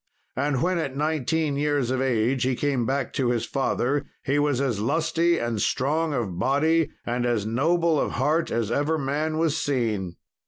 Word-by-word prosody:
And 140 0 0
when 180 0 +1
at 135 -4 -3
nineteen 155 0 0
years 145 -4 0
of 130 0 0
age 125 0 +1
he 130 0 +1
came 130 -4 0
back 135 -1 -1
to 130 -3 0
his 120 -1 0
father, 135 +1 -1 0.2
he 145 +1 +1
was 145 -3 +1
as 130 -7 0
lusty 165 +7 +1
and 115 -3 -2
strong 155 +4 0
of 105 -10 -2
body 155 - +2 0.2
and 120 +1 -1
as 120 -4 0
noble 160 +7 +2
of - - -1
heart 150 +6 +1
as 115 -2 -1
ever 145 +5 +1
man 150 +3 -1
was 160 -2 +1
seen. 110 -10 -1
140 Hz, 180 wpm, -25 LUFS, 120-155 Hz, 0.2 s, body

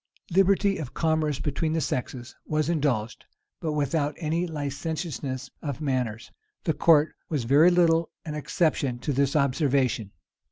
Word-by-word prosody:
Liberty 195 +2 +3
of 140 -5 -7
commerce 155 -3 +1
between 155 +2 -1
the 165 - +1
sexes 125 -4 -4
was 155 0 0
indulged, 135 -9 -1 0.4
but 160 -3 -2
without 145 0 0
any 165 +2 -1
licentiousness 145 -3 -4
of 145 -3 -4
manners. 125 -7 -2 0.3
The 160 - +1
court 155 0 +4 0.2
was 150 -6 -1
very 145 +8 +6
little 170 -2 +3 0.2
an 155 - -4
exception 150 -4 0
to 145 +4 -2
this 140 +2 +1
observation. 135 - +1
150 Hz, 135 wpm, -26 LUFS, 135-160 Hz, 0.4 s, very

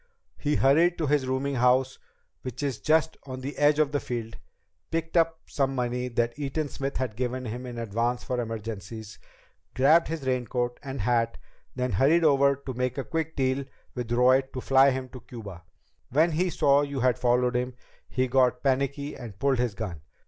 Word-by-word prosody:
He 150 0 0
hurried 165 +6 +4
to 160 - -1
his 145 -2 +1
rooming 130 +2 -1
house, 125 +2 +3 0.4
which 130 +2 -6
is 135 -6 -2
just 160 +7 +2
on 130 -1 -6
the 140 +3 -5
edge 145 0 +4
of 155 -2 +2
the 145 - 0
field, 115 -3 -5 0.5
picked 165 0 -3
up 165 -1 +2
some 135 -1 -1
money 125 0 -1
that 120 +1 -1
Eaton 145 +1 -2
Smith 135 0 -4
had 125 -5 -2
given 125 +1 -2
him 125 +3 -5
in 120 -1 -7
advance 115 +2 -1
for 125 -1 -2
emergencies, 110 -1 -6 0.6
grabbed 155 +6 +5
his 160 -3 -4
raincoat 125 -1 -1
and 135 -1 -5
hat, 115 -1 +1 0.4
then 125 -1 -1
hurried 145 - +4
over 140 -2 +4
to 135 -1 -7
make 125 +1 -2
a 135 - -1
quick 160 +1 -3
deal 130 0 0 0.3
with 120 -2 -5
Roy 125 +2 +5
to 130 0 -8
fly 135 +2 +5
him 130 -1 -2
to 125 0 -10
Cuba. 105 -7 -9 0.5
When 160 +6 +3
he 180 +4 +1
saw 140 -3 +3
you 140 -2 -3
had 125 -2 +2
followed 125 0 +2
him, 125 0 -1 0.3
he 130 0 0
got 125 0 +2
panicky 140 +2 0
and 115 -6 -9
pulled 135 +1 +1
his 120 -4 0
gun. 95 -9 -5
130 Hz, 185 wpm, -27 LUFS, 120-140 Hz, 0.6 s, grabbed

